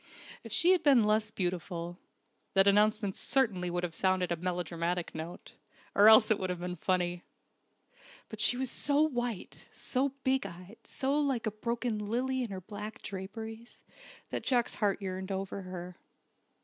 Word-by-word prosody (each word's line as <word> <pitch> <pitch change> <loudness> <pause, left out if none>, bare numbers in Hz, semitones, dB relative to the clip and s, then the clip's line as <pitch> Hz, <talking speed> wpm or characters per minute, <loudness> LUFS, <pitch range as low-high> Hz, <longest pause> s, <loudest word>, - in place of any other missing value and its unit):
If 230 - -10
she 340 - +5
had 370 -3 +4
been 275 -7 +5
less 215 0 +2
beautiful, 175 -2 -4 0.6
that 195 0 +6
announcement 210 0 +3
certainly 215 -9 +1
would 175 0 -2
have 175 -2 -3
sounded 185 0 +1
a - - +2
melodramatic 175 0 -2
note 160 +2 -7 0.4
or 205 +2 +7
else 220 0 +7
it 215 - +3
would 185 - -2
have 180 -1 -3
been 180 0 -3
funny. 175 0 0 1.1
But - - -5
she 245 - +3
was 260 -1 0
so 290 +1 +3
white, 245 -8 -3
so 270 +2 0
big 265 -5 +1
eyed, 180 +4 -12
so 270 +1 -1
like 270 -6 0
a 220 - 0
broken 235 +1 -2
lily 250 +5 -1
in 240 - -3
her 190 -1 -6
black 210 +3 -8
draperies, 220 +4 -8 0.5
that - - -2
Jack's 245 -3 +1
heart 200 -1 0
yearned 190 0 -4
over 195 +1 -3
her. 180 -1 -8
205 Hz, 160 wpm, -31 LUFS, 180-235 Hz, 1.1 s, or